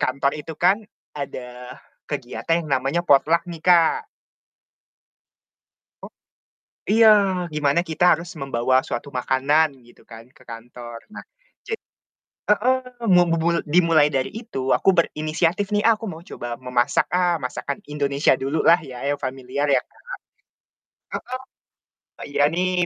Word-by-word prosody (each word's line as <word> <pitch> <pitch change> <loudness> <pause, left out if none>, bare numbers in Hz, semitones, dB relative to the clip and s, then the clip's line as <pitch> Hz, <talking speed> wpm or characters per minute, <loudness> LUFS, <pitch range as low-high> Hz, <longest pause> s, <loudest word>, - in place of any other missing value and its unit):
kantor 140 0 0
itu 160 +2 -8
kan 195 +5 +3 0.3
ada 125 -3 -8 0.3
kegiatan 165 0 -2
yang 150 - -9
namanya 135 +6 -1
potluck 155 +4 +4
nih 165 -2 -8
Kak. 180 - +4 2.0
O - - -6 0.8
iya, 220 +1 +6 0.4
gimana 150 +1 +1
kita 175 +1 +3
harus 170 +1 -9
membawa 130 -1 +1
suatu 120 +4 -4
makanan 140 +4 +2
gitu 120 - -20
kan 115 -1 -11
ke - - -20
kantor, 120 0 -10
nah, - - -9 0.4
jad 450 - -3 0.7
heeh, 240 +5 +3 0.4
mau 175 0 +6
bubul 165 +1 +1
dimulai 165 -1 +4
dari 130 -1 0
itu, 220 - -5
aku - - +2
berinisiatif 170 +3 0
nih, 205 - +2
ah, 230 - +5
aku 225 - -8
mau 160 - -9
coba 120 -8 -7
memasak 125 0 0
ah, 175 -2 +2
masakan 130 +2 -4
Indonesia 140 -1 +1
dululah 155 +5 +3
ya, 125 -2 -9
yang 145 - 0
familiar 130 +2 -3
ya, - - +4
Kak, - - -25 1.2
heeh, 255 +1 -7 0.9
iya 145 0 +2
nih 180 0 +1
150 Hz, 130 wpm, -22 LUFS, 130-175 Hz, 2.0 s, iya